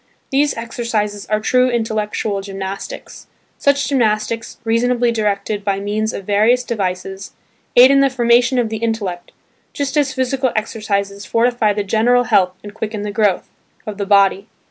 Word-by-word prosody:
These 285 Hz, +2 st, +2 dB
exercises 225 Hz, -3 st, -3 dB
are 215 Hz, +1 st, +1 dB
true 250 Hz, +4 st, +2 dB
intellectual 215 Hz, -3 st, -2 dB
gymnastics. 195 Hz, -, -7 dB, 0.3 s
Such 280 Hz, 0 st, +2 dB
gymnastics, 225 Hz, -3 st, -1 dB
reasonably 240 Hz, +1 st, +1 dB
directed 210 Hz, -2 st, -1 dB
by 195 Hz, -1 st, -1 dB
means 215 Hz, +2 st, -2 dB
of 195 Hz, -, -7 dB
various 220 Hz, +5 st, +3 dB
devices, 195 Hz, -3 st, -4 dB, 0.4 s
aid 250 Hz, +2 st, +8 dB
in 275 Hz, -, +5 dB
the 275 Hz, 0 st, +4 dB
formation 245 Hz, 0 st, +3 dB
of 240 Hz, -3 st, +1 dB
the 220 Hz, -, -3 dB
intellect, 215 Hz, -6 st, -3 dB, 0.4 s
just 280 Hz, 0 st, -3 dB
as 285 Hz, -2 st, +1 dB
physical 260 Hz, 0 st, 0 dB
exercises 200 Hz, -2 st, -2 dB
fortify 230 Hz, -2 st, +2 dB
the 205 Hz, 0 st, -2 dB
general 230 Hz, +5 st, +2 dB
health 185 Hz, -5 st, +2 dB
and 205 Hz, 0 st, -9 dB
quicken 215 Hz, -1 st, -4 dB
the 210 Hz, -, -3 dB
growth 205 Hz, -3 st, +1 dB, 0.4 s
of 210 Hz, -1 st, -6 dB
the 200 Hz, -, -2 dB
body. 200 Hz, 0 st, +3 dB
220 Hz, 150 wpm, -18 LUFS, 200-245 Hz, 0.4 s, aid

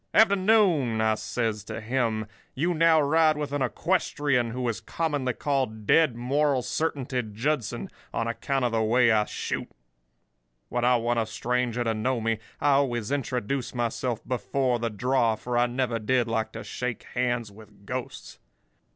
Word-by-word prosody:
"'Afternoon!' 185 Hz, -, +4 dB
says 110 Hz, -1 st, -2 dB
I -, -, -4 dB
to -, -, -4 dB
him. 115 Hz, -1 st, -1 dB, 0.3 s
'You 170 Hz, +6 st, +1 dB
now 165 Hz, 0 st, +5 dB
ride 155 Hz, +1 st, +3 dB
with 145 Hz, -1 st, -4 dB
a 145 Hz, -2 st, 0 dB
equestrian 145 Hz, -, 0 dB
who 125 Hz, +1 st, -3 dB
is 115 Hz, -2 st, -2 dB
commonly 145 Hz, -1 st, -1 dB
called 130 Hz, -6 st, -2 dB
Dead 155 Hz, 0 st, +4 dB
Moral 135 Hz, +2 st, +1 dB
Certainty 130 Hz, 0 st, -1 dB
Judson, 115 Hz, +3 st, -2 dB, 0.2 s
on 115 Hz, -, -1 dB
account 130 Hz, +3 st, -1 dB
of 120 Hz, -, +1 dB
the 115 Hz, -1 st, +1 dB
way 120 Hz, +2 st, +4 dB
I 105 Hz, -1 st, +3 dB
shoot. -, -, -4 dB, 1.0 s
When 120 Hz, 0 st, -1 dB
I 125 Hz, +1 st, +5 dB
want 120 Hz, 0 st, +1 dB
a 110 Hz, -, -1 dB
stranger 120 Hz, +3 st, -1 dB
to 115 Hz, -1 st, 0 dB
know 120 Hz, +3 st, 0 dB
me 115 Hz, -1 st, -1 dB, 0.2 s
I 145 Hz, -, +3 dB
always 125 Hz, -5 st, +1 dB
introduce 130 Hz, -2 st, -2 dB
myself 120 Hz, 0 st, -2 dB
before 125 Hz, +1 st, 0 dB
the 115 Hz, 0 st, -1 dB
draw, 115 Hz, +1 st, +1 dB
for 120 Hz, +3 st, -4 dB
I 120 Hz, 0 st, +4 dB
never 120 Hz, -2 st, -1 dB
did 120 Hz, +2 st, +1 dB
like 110 Hz, -1 st, -1 dB
to 115 Hz, -, -6 dB
shake 125 Hz, -2 st, -4 dB
hands 120 Hz, -3 st, -1 dB
with 105 Hz, -1 st, -17 dB
ghosts. 125 Hz, +3 st, -6 dB
125 Hz, 160 wpm, -26 LUFS, 115-140 Hz, 1.0 s, now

